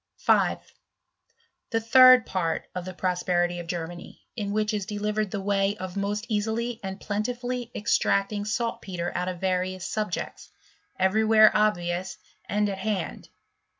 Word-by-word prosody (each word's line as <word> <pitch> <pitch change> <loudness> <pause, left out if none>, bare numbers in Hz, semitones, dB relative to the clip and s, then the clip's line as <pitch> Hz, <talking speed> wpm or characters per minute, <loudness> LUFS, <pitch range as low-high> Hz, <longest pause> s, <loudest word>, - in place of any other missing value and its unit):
5. - - +3 1.1
The 225 - +1
third 255 +2 +7
part 170 -4 -2
of 180 -1 -5
the 185 - -6
Prosperity 175 -1 0
of 170 - -7
Germany 175 0 -6
( - - -54
in 205 -3 -3
which 215 +1 0
is 205 -3 -2
delivered 210 0 -1
the 205 - -3
way 195 +1 0
of 185 -1 -6
most 205 +2 -2
easily 225 +2 -1
and 190 0 -5
pleft 210 +1 -2
tifuUy 245 -1 -4
extracting 205 0 +1
saltpetre 205 -5 -3
out 180 0 -2
of 180 -2 -4
various 185 0 -1
subj^eti^ 210 -4 -4 0.5
every 190 +4 +2
where 215 0 +6
obvious 185 -3 0 0.3
and 210 +1 +1
at 195 -1 -4
hand. 195 -4 -3
200 Hz, 150 wpm, -26 LUFS, 185-215 Hz, 1.1 s, third